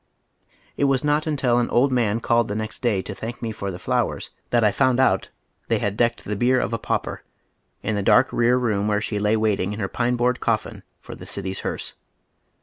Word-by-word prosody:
It 145 - +2
was 135 -1 +2
not 150 +1 +1
imtil 130 -6 +1
an 120 - -1
old 130 +3 +3
man 115 -3 +1
called 115 -1 +2
the 105 - -3
next 110 +1 -4
day 110 -7 +1
to 105 - -6
thank 115 +4 -6
me 115 -2 -3
for 100 -2 -5
the 90 - -5
flowers - - -1 0.2
tliat 120 -1 +3
I 105 - +4
found 130 +4 +2
out 130 - +2 0.4
they - - +2
had 100 0 -1
decked 120 +1 +1
tiie 105 -1 -3
bier 130 +1 +3
of 115 -1 -2
a 115 - -1
pauper, - - -2 0.6
in 110 - -1
the 100 - 0
dark 105 +6 +4
rear 120 +1 +3
room 105 -5 0
where 105 -1 +2
she 105 -1 -3
lay 105 +2 +2
waiting 105 -3 0
in 105 - -6
her 95 - -1
pine 120 +4 0
board 125 +1 +1
colfin 110 -2 -1 0.2
for - - -10
the - - -11
city's 95 -1 -4
hearse. - - -4
115 Hz, 225 wpm, -23 LUFS, 105-125 Hz, 0.6 s, I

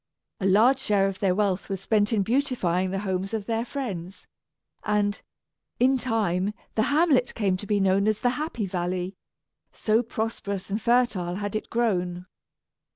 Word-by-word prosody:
A 195 - 0
large 230 +8 +5
share 200 -6 +2
of 190 -1 -4
their 190 -3 +2
wealth 200 -2 0
was 195 -1 -2
spent 205 +2 +1
in 210 -3 +2
beautifying 220 -7 0
the 195 - -2
homes 190 +2 -2
of 210 -2 -4
their 225 +1 -1
friends; 200 - -6 0.6
and, 205 -1 0 0.6
in 260 +2 +4
time, 210 -5 0 0.2
the 220 - +1
hamlet 290 -4 +3
came 200 -5 +1
to 205 - -8
be 205 -1 +2
known 195 +1 +3
as 215 -1 +1
the 245 - +3
"Happy 260 -5 -3
Valley," 180 0 -2 0.6
so 220 +1 +1
prosperous 220 -4 -4
and 210 +3 -1
fertile 235 -7 +1
had 205 +1 -4
it 215 - -3
grown. 180 -6 0
205 Hz, 160 wpm, -26 LUFS, 190-230 Hz, 0.6 s, large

